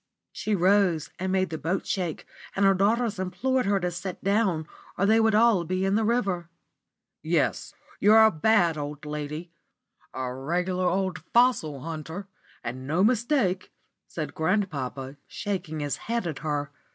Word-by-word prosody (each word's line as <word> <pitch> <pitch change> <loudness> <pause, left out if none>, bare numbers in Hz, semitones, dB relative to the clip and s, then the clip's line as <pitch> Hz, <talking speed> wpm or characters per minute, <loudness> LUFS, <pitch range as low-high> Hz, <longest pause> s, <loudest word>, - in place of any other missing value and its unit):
She 215 - -1
rose 185 -3 +3
and 185 +1 -1
made 185 -2 +1
the 160 - -4
boat 180 +4 -1
shake, 180 -5 -2 0.3
and 200 - +3
her 195 - +6
daughters 215 +2 +1
implored 210 +7 0
her 200 -1 +2
to 180 0 -1
sit 180 +1 -6
down, 195 -6 +1 0.3
or 200 - +2
they 220 +2 +5
would 220 -1 +3
all 220 -5 +4
be 185 +3 -1
in 195 - +1
the 220 +2 +2
river. 195 -7 0 0.7
"Yes, - - 0 0.2
you're 220 +2 +7
a 220 - +6
bad 170 -2 +3
old 145 +1 -6
lady 150 +3 -5 0.6
a 130 -1 -4
regular 180 +7 -1
old 185 -2 0 0.2
fossil 235 - +3
hunter, 165 +5 -6 0.4
and 130 +3 -5
no 165 +6 +2
mistake," 230 -4 +1 0.4
said 155 -3 -5
grandpapa, 145 -7 -2
shaking 175 -6 -4
his 145 -1 -2
head 235 -2 -2
at 160 -5 -4
her. 145 -2 -2
185 Hz, 155 wpm, -26 LUFS, 155-205 Hz, 0.7 s, you're